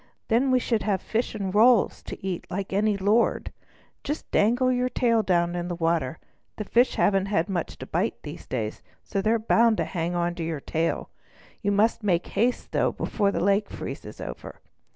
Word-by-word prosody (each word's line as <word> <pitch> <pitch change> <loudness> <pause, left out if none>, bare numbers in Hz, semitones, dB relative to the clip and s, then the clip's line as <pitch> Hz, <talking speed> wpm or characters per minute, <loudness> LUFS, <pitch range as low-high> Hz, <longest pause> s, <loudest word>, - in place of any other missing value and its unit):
Then 245 +4 +3
we 255 - +4
should 230 -3 0
have 200 -3 0
fish 230 +4 -2
and 195 -3 -3
rolls 225 +1 +4
to - - -8
eat 185 -3 -3
like 195 +1 -4
any 205 +1 +2
lord. 205 +4 +1 0.5
Just 295 +2 -5
dangle 245 +5 +3
your 250 0 +1
tail 230 -3 +2
down 175 -3 +1
in 175 0 -3
the 175 - -3
water; 165 -4 0 0.4
the 215 - -4
fish 240 +5 +2
haven't 195 -1 +2 0.2
much 180 -4 -3
to - - -7
bite - - -2
these - - -9
days, 110 -4 -3 0.2
so 195 - -2
they're 220 +3 +2
bound 230 0 +3
to - - 0
hang 170 0 -3
on 175 0 0
to 175 -1 -5
your 160 -2 -3
tail. 160 +4 -2 0.5
You 205 -2 0
must 215 +4 +2
make 180 -5 +1
haste, 245 +3 0
though, - - +2
before 200 -3 0
the - - -1
lake 200 +1 +2
freezes - - -7
over." - - -8
200 Hz, 190 wpm, -26 LUFS, 175-230 Hz, 0.5 s, we